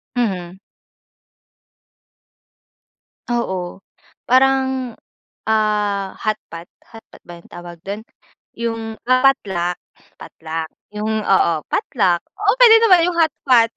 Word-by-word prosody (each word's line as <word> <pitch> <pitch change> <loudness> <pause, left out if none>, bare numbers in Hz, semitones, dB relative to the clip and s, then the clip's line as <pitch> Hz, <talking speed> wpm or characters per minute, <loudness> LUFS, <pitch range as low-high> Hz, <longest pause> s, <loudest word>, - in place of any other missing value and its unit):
Mhm. 190 -6 -2 2.7
Oo, 190 -6 -3 0.5
parang, 265 -1 +2 0.5
ah, 210 -3 0
hotpot. 175 -6 -4 0.2
Hotpot 225 -1 -16
ba 175 - -9
yung - - -23
tawag 175 -1 -10
dun? 205 +2 -5 0.5
Yung, 225 -1 -4
totluck, 235 -9 +2 0.4
totluck, 160 0 -6 0.3
yung 215 0 -2
oo, 190 -3 +3
potluck. 195 - 0
Oo, 410 +1 -1
pwede 460 -2 +9
naman 370 -6 +6
yung 340 - -5
hotpot. 255 -7 +3
220 Hz, 90 wpm, -19 LUFS, 185-255 Hz, 2.7 s, pwede